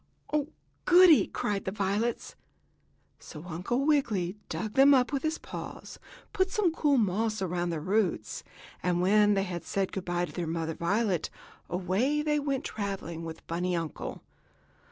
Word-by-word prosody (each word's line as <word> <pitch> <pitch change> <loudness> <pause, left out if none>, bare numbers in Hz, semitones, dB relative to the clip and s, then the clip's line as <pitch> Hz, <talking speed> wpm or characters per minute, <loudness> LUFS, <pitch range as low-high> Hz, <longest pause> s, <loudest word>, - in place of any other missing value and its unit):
"Oh, 295 -1 +1 0.4
goodie!" 355 -3 +7
cried 200 -2 -2
the 190 - -1
violets. 205 +4 -1 0.8
So 155 +1 -10
Uncle 185 - -2
Wiggily 215 - +1
dug 215 -1 -4
them 275 +1 +7
up 250 +1 +2
with 275 - 0
his 315 0 -1
paws, - - -8 0.3
putting 375 -2 +1
some 390 -5 +2
cool 295 -3 +2
moss 215 +1 +1
around 175 -2 -1
their 165 -2 -2
roots, 185 - -1 0.4
and 175 0 +1
when 205 +3 +4
they 195 - +1
had 180 -3 -5
said 195 -1 -1
good 190 - -5
by 175 0 0
to - - -11
the 175 -2 -4
mother 165 0 -2
violet 190 0 0 0.4
away 195 - 0
they 300 -1 +1
went 275 -2 -1
traveling 195 -5 -4
with 160 0 -6
the - - -23
bunny 175 +2 -1
uncle. 165 -2 -5
200 Hz, 160 wpm, -29 LUFS, 175-265 Hz, 0.8 s, goodie